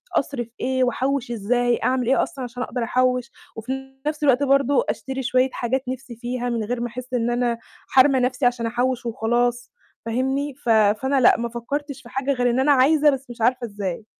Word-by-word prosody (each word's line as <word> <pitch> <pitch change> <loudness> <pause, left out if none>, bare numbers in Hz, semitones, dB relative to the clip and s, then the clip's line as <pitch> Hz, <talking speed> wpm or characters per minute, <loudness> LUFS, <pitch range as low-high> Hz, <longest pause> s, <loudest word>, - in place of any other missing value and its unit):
أصرف 260 -4 -1
إيه؟ 260 0 +1
وأحوِّش 255 0 -1
إزاي؟ 240 +2 +1
أعمل 255 -2 +1
إيه 265 - +3
أصلًا 270 - -6
عشان 245 0 -5
أقدر 245 -1 -3
أحوِّش، 250 0 +1 0.2
وفي 265 +4 -6
نَفْس 300 0 -2
الوقت 275 -1 +4
برضه 275 0 +3
أشتري 265 0 -3
شوية 255 +1 +2
حاجات 255 +2 -1
نِفْسي 255 -2 -6
فيها 245 +1 -3
من 230 -2 -1
غير 240 +3 -3
ما 240 - -1
أحِسّ 250 +2 -9
إن 240 -1 +1
أنا 240 -1 0 0.3
حارمة 265 0 +5
نَفْسي 250 +1 0
عشان 245 -1 +1
أحوِّش 245 +1 -1
وخلاص 240 +1 0 0.3
فاهمني؟ 265 +5 -1
ف 260 -3 -6
فأنا 225 +5 +3
لأ، 235 - +6
ما 235 0 -3
فكّرتش 280 +4 -5
في 235 - -14
حاجة 270 +1 -1
غير 245 -1 +1
إن 245 +2 +1
أنا 290 +2 +4
عايزة 295 +3 +5
بس 270 -2 -2
مش 235 -1 -9
عارفة 245 +1 +2
إزاي. 200 -1 -5
250 Hz, 195 wpm, -23 LUFS, 240-265 Hz, 0.3 s, لأ